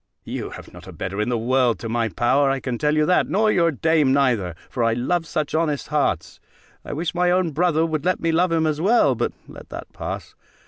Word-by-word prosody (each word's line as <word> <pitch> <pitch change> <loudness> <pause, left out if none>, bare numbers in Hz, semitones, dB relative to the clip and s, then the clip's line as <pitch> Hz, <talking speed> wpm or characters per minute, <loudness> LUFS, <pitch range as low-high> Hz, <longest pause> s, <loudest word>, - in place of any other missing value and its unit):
You - - -5
have - - -11
not - - -13
a - - -8
better 100 +2 -4
in 105 - -1
the 120 - 0
world, 125 +1 +2
to 115 - -6
my 115 0 0
power, 130 +8 +2
I 135 0 0
can 125 -3 -4
tell 150 0 +1
you 155 - +3
that, 180 - +2
nor 215 +2 +2
your 170 -3 +3
dame 155 -1 +2
neither; 120 -11 +1
for 120 - -2
I 115 0 +2
love 160 +8 -1
such 155 -3 -2
honest 155 -3 -1
hearts: 140 - -1 0.4
I - - -7
wish 160 +3 -3
my 180 0 +2
own 180 -2 +2
brother 165 +1 +2
would 155 -3 -2
let 185 +1 +1
me 165 - 0
love 175 +2 +2
him 165 -1 +2
as 155 0 -1
well; 195 - +4
but 120 - -1 0.2
let - - -12
that - - -9
pass. - - -6
150 Hz, 235 wpm, -22 LUFS, 125-165 Hz, 0.4 s, well